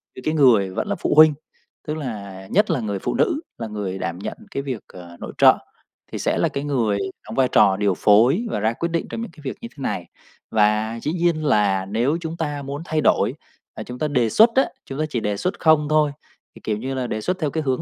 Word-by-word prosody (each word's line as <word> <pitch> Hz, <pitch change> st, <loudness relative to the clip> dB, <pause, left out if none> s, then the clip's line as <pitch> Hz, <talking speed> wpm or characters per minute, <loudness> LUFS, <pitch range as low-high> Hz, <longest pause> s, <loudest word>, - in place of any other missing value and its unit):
những 130 Hz, -, -10 dB
cái 155 Hz, -, +1 dB
người 120 Hz, -10 st, +4 dB
vẫn 95 Hz, -, -3 dB
là -, -, -1 dB
phụ -, -, -1 dB
huynh. 155 Hz, 0 st, +8 dB, 0.5 s
Tức 155 Hz, +1 st, -2 dB
là 100 Hz, -8 st, -7 dB
nhất 210 Hz, +1 st, +3 dB
là 160 Hz, -, +1 dB
người 105 Hz, -4 st, -3 dB
phụ -, -, -2 dB
nữ 295 Hz, -, +1 dB, 0.2 s
là 115 Hz, -, -5 dB
người 100 Hz, -3 st, -4 dB
đảm 90 Hz, -1 st, -4 dB
nhận -, -, -5 dB
cái 140 Hz, -, -3 dB
việc, 130 Hz, -6 st, -4 dB
ờ, 85 Hz, -1 st, -12 dB
nội -, -, -7 dB
trợ -, -, +7 dB, 0.5 s
thì -, -, -4 dB
sẽ -, -, 0 dB
là -, -, +2 dB
cái 140 Hz, -, -4 dB
người 120 Hz, -8 st, 0 dB, 0.3 s
đóng -, -, -7 dB
vai 130 Hz, -1 st, +3 dB
trò 100 Hz, -2 st, +5 dB
điều 100 Hz, -1 st, +2 dB
phối 120 Hz, -, +4 dB
và -, -, -2 dB
ra 110 Hz, +2 st, +1 dB
quyết 170 Hz, +7 st, -3 dB
định 165 Hz, -, -1 dB
trong 225 Hz, -, -5 dB
những 230 Hz, -, -6 dB
cái 160 Hz, -, -16 dB
việc 135 Hz, -, -5 dB
như 235 Hz, -, -6 dB
thế -, -, -9 dB
này. 90 Hz, -, -2 dB, 0.5 s
Và 110 Hz, +1 st, +2 dB
dĩ 150 Hz, -, -1 dB
nhiên 170 Hz, -3 st, 0 dB
là 100 Hz, -7 st, +2 dB
nếu 120 Hz, +10 st, 0 dB
chúng 165 Hz, 0 st, -5 dB
ta 150 Hz, -3 st, -3 dB
muốn 140 Hz, +2 st, -5 dB
thay 155 Hz, -1 st, 0 dB
đổi, -, -, +2 dB, 0.4 s
à, -, -, -7 dB
chúng 125 Hz, 0 st, -9 dB
ta 155 Hz, -, 0 dB
đề 125 Hz, -6 st, +1 dB
xuất 225 Hz, -, +6 dB
á, 265 Hz, -, +5 dB, 0.2 s
chúng 135 Hz, +2 st, -7 dB
ta 155 Hz, -, +1 dB
chỉ 125 Hz, -, -1 dB
đề 105 Hz, -2 st, -2 dB
xuất 185 Hz, -, -2 dB
không 155 Hz, -2 st, +4 dB
thôi, 155 Hz, -1 st, +3 dB, 0.4 s
thì -, -, -14 dB
kiểu 105 Hz, -1 st, -1 dB
như 130 Hz, +5 st, -4 dB
là, 130 Hz, -2 st, -2 dB
đề 110 Hz, -, -3 dB
xuất 185 Hz, -, -2 dB
theo 155 Hz, -4 st, 0 dB
cái 160 Hz, +2 st, -2 dB
hướng 130 Hz, -3 st, 0 dB
130 Hz, 255 wpm, -22 LUFS, 105-155 Hz, 0.5 s, huynh